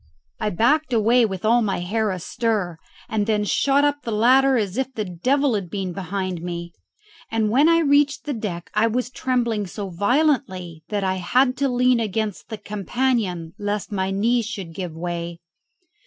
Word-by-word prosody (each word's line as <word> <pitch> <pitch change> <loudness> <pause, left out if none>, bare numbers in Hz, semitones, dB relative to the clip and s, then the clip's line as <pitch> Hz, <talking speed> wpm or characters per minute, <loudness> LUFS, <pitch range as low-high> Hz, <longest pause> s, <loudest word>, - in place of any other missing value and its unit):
I - - 0
backed 250 - +2
away 230 +1 +4
with 190 0 -5
all 235 +2 +4
my 200 -5 -1
hair 215 +4 0
astir, 185 -1 -2 0.3
and 210 -1 -1
then 210 -1 +1
shot 275 +7 +2
up 290 0 0
the 230 - -5
ladder 260 +5 +4
as 205 -4 -1
if 265 +1 -1
the 215 - -2
devil 255 +10 +1
had 195 -5 -2
been 190 -1 -3
behind 185 -1 -3
me; 170 0 -5 0.6
and 220 -2 0
when 285 +7 +5
I 335 0 +4
reached 285 -1 +3
the 295 - -2
deck 195 -7 -5
I 215 +2 +3
was 245 +2 -1
trembling 235 -6 -1
so 195 0 -6
violently 200 - 0
that 205 -2 -1
I 190 0 0
had 250 +8 +2
to 275 0 +1
lean 250 0 +3
against 215 -1 -3
the 220 - -5
companion 205 -5 -1
lest 205 +1 -3
my 190 -2 -1
knees 225 +4 +1
should 195 -7 -6
give 175 -2 -5
way. 170 0 -4
215 Hz, 175 wpm, -22 LUFS, 185-250 Hz, 0.6 s, when